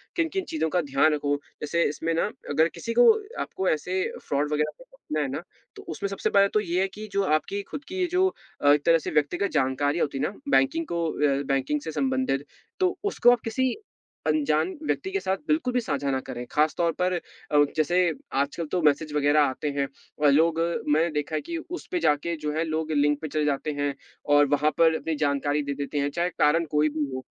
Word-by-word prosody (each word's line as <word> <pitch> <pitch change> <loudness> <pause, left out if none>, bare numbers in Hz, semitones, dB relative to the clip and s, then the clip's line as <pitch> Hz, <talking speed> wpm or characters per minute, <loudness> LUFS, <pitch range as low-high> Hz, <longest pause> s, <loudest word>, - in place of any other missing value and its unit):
किन-किन 355 +3 -1
चीज़ों 315 - -1
का 180 +2 +1
ध्यान 145 +1 +2
रखो। 145 -1 0 0.3
जैसे 170 +3 +1
इसमें 165 +3 -2
ना 165 - +1 0.2
अगर 160 +3 +3
किसी 230 - -4
को 245 - +7 0.3
आपको 190 - -2
ऐसे 180 +4 -1 0.3
फ्रॉड 145 +1 0
वगैरह 150 0 +1
से - - -14
बचना 155 - -5
है 145 - 0
ना, 140 - -3 0.3
तो - - -10
उसमें 180 +5 -3
सबसे 195 - -1
पहले 200 0 +5
तो 215 - +2
ये 185 -2 0
है 195 - +2
कि 210 +3 -9
जो 200 0 +1
आपकी 190 +4 0
खुद 290 - -5
की 365 - -7
ये 365 - +2
जो 370 +1 +3 0.3
अ, 145 - +5
एक 145 0 0
तरह 165 0 +6
से 160 - -5
व्यक्तिगत 165 +7 +1
जानकारी 145 +4 +1
होती 140 -3 -1
है - - -2
ना - - -1 0.2
बैंकिंग 320 +5 +2
को 170 0 -2
अ, 140 -1 +1
बैंकिंग 140 +2 0
से 160 - -5
संबंधित, 260 - 0 0.3
तो 370 -1 +1
उसको 245 - +4
आप 245 - +2
किसी 255 +3 0 0.5
अनजान 155 +2 +2 0.2
व्यक्ति 385 - -1
के 395 - 0
साथ 190 - -1
बिल्कुल 305 -5 +1
भी 250 - +3
साझा 140 -8 -2
ना 130 - 0
करें। 120 0 -5
खासतौर 155 +3 +2
पर 180 0 +2 0.4
अ, 145 -1 +5
जैसे 175 +3 +3 0.2
आजकल 140 +5 -1
तो 180 - +1
मैसेज 150 0 +2
वगैरह 150 +1 +3
आते 145 +1 0
हैं, 140 -1 +1 0.4
अ, - - +7
लोग 160 +3 +3 0.3
मैंने 155 +3 +3
देखा 150 +1 -2
है - - 0
कि 340 +2 -5
उस 355 - -6
पे 360 - 0
जाके 170 - +1
जो 150 - 0
है 160 - +1
लोग 160 0 -2
लिंक 145 -1 +2
पे 160 - -3
चले 150 0 -1
जाते 145 +1 -1
हैं 145 -1 0 0.4
और 145 0 +6
वहाँ 150 +2 +2
पर 165 -1 +5
अपनी 160 0 -2
जानकारी 145 +1 0
दे 140 - -3
देते 140 +1 -4
हैं, 140 0 0
चाहे 170 +4 -1
कारण 165 0 +2
कोई 150 +1 +3
भी 150 0 -2
हो। 130 - -5
155 Hz, 220 wpm, -26 LUFS, 145-190 Hz, 0.5 s, को